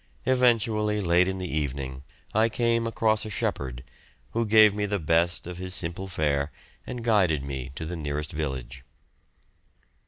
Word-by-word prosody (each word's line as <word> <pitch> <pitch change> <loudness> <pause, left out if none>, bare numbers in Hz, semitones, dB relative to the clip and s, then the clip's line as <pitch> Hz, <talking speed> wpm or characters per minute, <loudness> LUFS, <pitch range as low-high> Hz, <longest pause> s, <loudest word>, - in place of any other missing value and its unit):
Eventually, 115 -4 +2
late 90 -1 +3
in 95 0 -2
the 90 -1 -4
evening 65 -3 -3 0.3
I 110 +2 +4
came 115 0 +1
across 110 -2 +1
a 110 - -5
shepherd, 65 - -3 0.5
who 115 0 0
gave 110 -1 +7
me 105 0 -1
the 100 0 0
best 85 +1 +1
of 90 0 -7
his 90 0 -4
simple 90 +3 -3
fare 75 -4 0 0.4
and 120 -2 -5
guided 90 - +2
me 65 -2 -5
to 80 - -5
the 90 +2 -4
nearest 75 -1 -3
village. 65 -4 -4
90 Hz, 155 wpm, -27 LUFS, 75-110 Hz, 0.5 s, gave